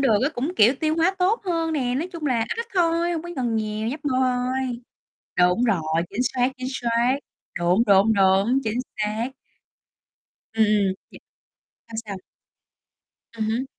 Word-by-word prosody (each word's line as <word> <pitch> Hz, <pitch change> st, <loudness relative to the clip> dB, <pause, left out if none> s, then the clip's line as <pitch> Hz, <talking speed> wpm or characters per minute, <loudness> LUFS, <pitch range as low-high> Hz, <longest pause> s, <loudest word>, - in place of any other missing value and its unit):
được 230 Hz, -7 st, +4 dB
á, 275 Hz, -, +3 dB
cũng, 275 Hz, +8 st, -2 dB
kiểu, 235 Hz, +6 st, +6 dB
tiêu 315 Hz, 0 st, +1 dB
hóa 340 Hz, +4 st, +2 dB
tốt 385 Hz, +6 st, +2 dB
hơn 330 Hz, -3 st, -1 dB
nè, 255 Hz, -5 st, 0 dB
nói 315 Hz, +8 st, -2 dB
chung 325 Hz, -3 st, -4 dB
là 245 Hz, -4 st, +1 dB
ít 230 Hz, -, -2 dB
ít 465 Hz, -, -5 dB
thôi, 340 Hz, -1 st, +2 dB
hông 325 Hz, -, -3 dB
có 345 Hz, -, -8 dB
cần 240 Hz, -3 st, 0 dB
nhiều, 215 Hz, 0 st, -2 dB
nhấp 285 Hz, +5 st, -6 dB
môi 260 Hz, -3 st, +1 dB
thôi. 255 Hz, -1 st, -1 dB, 0.6 s
Đúng 180 Hz, +6 st, +4 dB
rồi, 200 Hz, -9 st, +2 dB, 0.3 s
chính 235 Hz, +5 st, -1 dB
xác, 250 Hz, 0 st, +1 dB
chính 255 Hz, 0 st, -4 dB
sác. 240 Hz, +1 st, +1 dB, 0.4 s
Đúng, 180 Hz, +6 st, +3 dB
đúng, 200 Hz, +3 st, +5 dB
đúng, 195 Hz, +6 st, +3 dB
chính 225 Hz, +1 st, -1 dB, 0.2 s
xác. 215 Hz, +3 st, -1 dB, 1.2 s
Ừm, 220 Hz, -1 st, +3 dB
ừm. 205 Hz, -2 st, +2 dB, 0.2 s
Nh -, -, -11 dB, 0.7 s
sao 225 Hz, -, -7 dB
sao? 200 Hz, -, -5 dB, 1.2 s
Ừm 220 Hz, -2 st, -3 dB
hứm. 240 Hz, +4 st, -1 dB
245 Hz, 175 wpm, -23 LUFS, 215-285 Hz, 1.2 s, kiểu